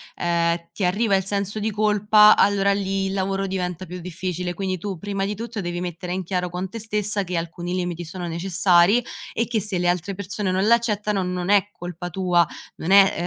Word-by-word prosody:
ehm, 170 Hz, 0 st, 0 dB
ti 200 Hz, -, -4 dB
arriva 200 Hz, +3 st, +2 dB
il 190 Hz, -, +1 dB
senso 200 Hz, +2 st, -2 dB
di 215 Hz, +1 st, -1 dB
colpa, 210 Hz, 0 st, +5 dB
allora 200 Hz, 0 st, +3 dB
lì 195 Hz, -1 st, -1 dB
il 190 Hz, -, -3 dB
lavoro 195 Hz, 0 st, -1 dB
diventa 185 Hz, -2 st, -3 dB
più 180 Hz, +1 st, -7 dB
difficile 180 Hz, 0 st, -4 dB
quindi 185 Hz, 0 st, -2 dB
tu 195 Hz, +1 st, -4 dB
prima 195 Hz, +2 st, -3 dB
di 205 Hz, +1 st, -3 dB
tutto 230 Hz, 0 st, -5 dB
devi 175 Hz, -1 st, -3 dB
mettere 180 Hz, 0 st, -4 dB
in 185 Hz, 0 st, -2 dB
chiaro 180 Hz, 0 st, -2 dB
con 180 Hz, +2 st, -4 dB
te 230 Hz, -, -7 dB
stessa 210 Hz, -1 st, -1 dB
che 180 Hz, -1 st, -3 dB
alcuni 170 Hz, +1 st, -4 dB
limiti 175 Hz, -2 st, -3 dB
sono 175 Hz, +2 st, -6 dB
necessari 180 Hz, +5 st, +3 dB, 0.3 s
e 230 Hz, -, 0 dB
che 230 Hz, -3 st, 0 dB
se 195 Hz, -2 st, -1 dB
le 175 Hz, 0 st, 0 dB
altre 180 Hz, +2 st, 0 dB
persone 200 Hz, +1 st, -3 dB
non 190 Hz, +2 st, +1 dB
l'accettano 210 Hz, -3 st, +2 dB
non 180 Hz, 0 st, -3 dB
è 205 Hz, -1 st, +4 dB
colpa 175 Hz, -1 st, -7 dB
tua, 180 Hz, -1 st, +2 dB, 0.3 s
non 160 Hz, -, -4 dB
è 195 Hz, -1 st, +7 dB
190 Hz, 205 wpm, -23 LUFS, 175-205 Hz, 0.3 s, è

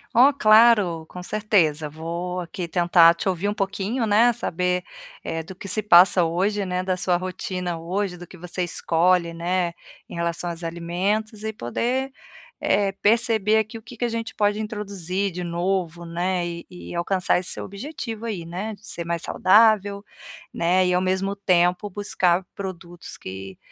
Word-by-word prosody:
Oh, 265 Hz, +4 st, +7 dB
claro, 215 Hz, -, +4 dB
com 180 Hz, 0 st, -8 dB
certeza, 175 Hz, -8 st, +1 dB
vou 170 Hz, +4 st, -4 dB
aqui 175 Hz, 0 st, -5 dB
tentar 170 Hz, -1 st, +5 dB
te -, -, -4 dB
ouvir 190 Hz, +2 st, 0 dB
um 205 Hz, -, -1 dB
pouquinho, 200 Hz, +4 st, -2 dB
né, 220 Hz, +3 st, +5 dB
saber, 180 Hz, -4 st, -1 dB, 0.4 s
eh, 165 Hz, -, -3 dB
do 175 Hz, +3 st, -10 dB
que 195 Hz, -, -9 dB
se 215 Hz, +3 st, 0 dB
passa 180 Hz, -2 st, +6 dB
hoje, 195 Hz, +5 st, 0 dB
né, 180 Hz, 0 st, -1 dB
da 185 Hz, -1 st, 0 dB
sua 180 Hz, -1 st, +1 dB
rotina 180 Hz, -1 st, -4 dB
hoje, 185 Hz, +2 st, -2 dB
do 175 Hz, 0 st, -11 dB
que 185 Hz, -, -13 dB
você 180 Hz, +1 st, -4 dB
escolhe, 170 Hz, 0 st, +1 dB
né, 175 Hz, +1 st, -1 dB, 0.3 s
em -, -, -12 dB
relação 170 Hz, 0 st, -2 dB
aos 170 Hz, +1 st, -8 dB
alimentos 190 Hz, +6 st, -2 dB
e 220 Hz, -, -2 dB
poder, 245 Hz, -, -2 dB, 0.5 s
eh, 200 Hz, -1 st, +2 dB
perceber 220 Hz, -1 st, +3 dB
aqui 220 Hz, +1 st, -1 dB
o -, -, -19 dB
que 240 Hz, +2 st, -13 dB
que 240 Hz, -, -1 dB
a -, -, +1 dB
gente 230 Hz, 0 st, -4 dB
pode 205 Hz, 0 st, +1 dB
introduzir 200 Hz, -3 st, -3 dB
de 180 Hz, +1 st, -5 dB
novo, 175 Hz, 0 st, -2 dB
né, 175 Hz, +1 st, -1 dB
e 170 Hz, 0 st, -7 dB
e 180 Hz, -, -10 dB
alcançar 180 Hz, +1 st, +1 dB
esse 180 Hz, -, -2 dB
seu -, -, -3 dB
objetivo 230 Hz, +1 st, -6 dB
aí, 190 Hz, -7 st, -4 dB
né, 190 Hz, +6 st, -5 dB
de 210 Hz, -, -20 dB
ser 170 Hz, -, -4 dB
mais 170 Hz, 0 st, -2 dB
saudável, 205 Hz, 0 st, +3 dB, 0.5 s
né, 180 Hz, +2 st, +2 dB
e 180 Hz, -, +2 dB
ao 180 Hz, -, +2 dB
mesmo 190 Hz, +2 st, 0 dB
tempo 180 Hz, 0 st, +2 dB
buscar 185 Hz, -2 st, +1 dB
produtos 175 Hz, -3 st, -8 dB
que 95 Hz, 0 st, -8 dB
185 Hz, 170 wpm, -23 LUFS, 170-210 Hz, 0.5 s, Oh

